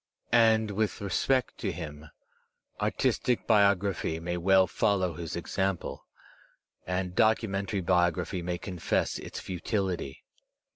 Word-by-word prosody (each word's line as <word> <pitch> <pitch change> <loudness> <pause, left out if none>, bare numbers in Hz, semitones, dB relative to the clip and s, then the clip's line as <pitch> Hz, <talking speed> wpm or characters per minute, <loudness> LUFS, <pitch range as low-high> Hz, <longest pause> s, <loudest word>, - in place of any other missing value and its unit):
And, 110 -2 +4
with 105 +1 -1
respect 125 +6 0
to - - -1
him, 75 -2 -7 0.7
artistic 125 -2 0
biography 100 -5 +2
may 85 +1 -3
weO 95 +2 +4
fol 100 -1 +1
low 90 -2 -1
his 80 +1 -6
example, 95 +2 -3 0.8
and 90 0 -2
documentary 100 -3 +1
biography 90 0 +1
may 90 0 -2
confess 90 -4 -1
its - - -7
futility. 90 -5 -3
95 Hz, 110 wpm, -29 LUFS, 85-100 Hz, 0.8 s, And